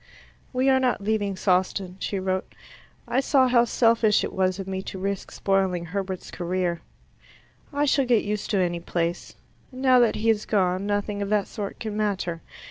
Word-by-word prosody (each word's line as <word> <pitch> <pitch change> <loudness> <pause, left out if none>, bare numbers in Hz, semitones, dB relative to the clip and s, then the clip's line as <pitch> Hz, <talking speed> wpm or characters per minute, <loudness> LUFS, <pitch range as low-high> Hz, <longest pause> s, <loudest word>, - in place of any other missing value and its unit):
"We 255 +1 +1
are 265 -1 +5
not 255 -5 +1
leaving 205 -2 0
Sawston," 185 0 0
she 200 - -2
wrote. 185 0 -3 0.5
"I 255 - +1
saw 270 -1 +3
how 240 -1 +4
selfish 230 -2 +3
it - - -4
was 185 -1 +1
of 195 -1 -6
me 190 0 -3
to 190 - -7
risk 195 +1 -3
spoiling 190 -3 0
Herbert's 190 +1 -4
career. 175 -1 -2 0.9
I 290 0 +1
shall 275 -1 +2
get 240 -3 +3
used 210 0 -3
to 205 - +1
any 175 -2 0
place. 170 0 -3 0.4
Now 255 -1 +4
that 235 -3 +3
he 225 +1 +2
is 215 -1 -2
gone, 190 -1 +1
nothing 205 0 -1
of 200 - -2
that 210 -1 +2
sort 205 -2 -6
can 215 -2 -4
matter. 195 -5 -1
200 Hz, 180 wpm, -25 LUFS, 185-225 Hz, 0.9 s, are